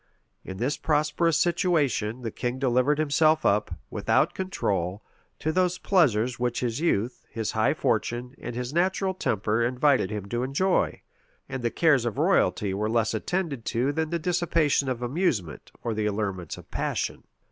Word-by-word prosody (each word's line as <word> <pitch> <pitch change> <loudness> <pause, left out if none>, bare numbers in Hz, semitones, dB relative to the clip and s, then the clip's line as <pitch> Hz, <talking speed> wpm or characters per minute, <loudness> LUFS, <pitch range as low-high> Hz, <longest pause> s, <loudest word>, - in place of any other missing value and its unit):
In 95 - -7
this 130 +7 -1
prosperous 155 +1 +1
situation, 150 - +1
the 115 - -3
king 125 +4 -3
delivered 130 +2 +2
himself 155 +1 +3
up, 105 +1 +2 0.2
without - - +2
control, 100 - -2 0.3
to 155 - -1
those 180 +1 +1
pleasures 125 - +2
which 120 -1 -1
his 120 0 -1
youth, 125 -8 0
his 110 -2 -3
high 110 +7 +2
fortune, 120 0 -1
and 120 0 -6
his 125 +2 -4
natural 190 +2 +1
temper 110 - 0
invited 130 -2 +2
him 105 -2 -4
to 120 +2 -1
enjoy; 140 +9 0 0.4
and 130 - -5
the 120 - +1
cares 145 -2 +3
of 120 - -2
royalty 100 -2 +2
were 105 +2 -1
less 115 -1 +1
attended 145 - -2
to 125 +5 0
than 160 +1 -1
the 170 - 0
dissipation 165 -4 +1
of 125 -1 -3
amusement, 120 - -1
or 115 - -1
the 110 0 -1
allurements 100 -6 -3
of - - -14
passion. - - -2
125 Hz, 160 wpm, -26 LUFS, 110-160 Hz, 0.4 s, himself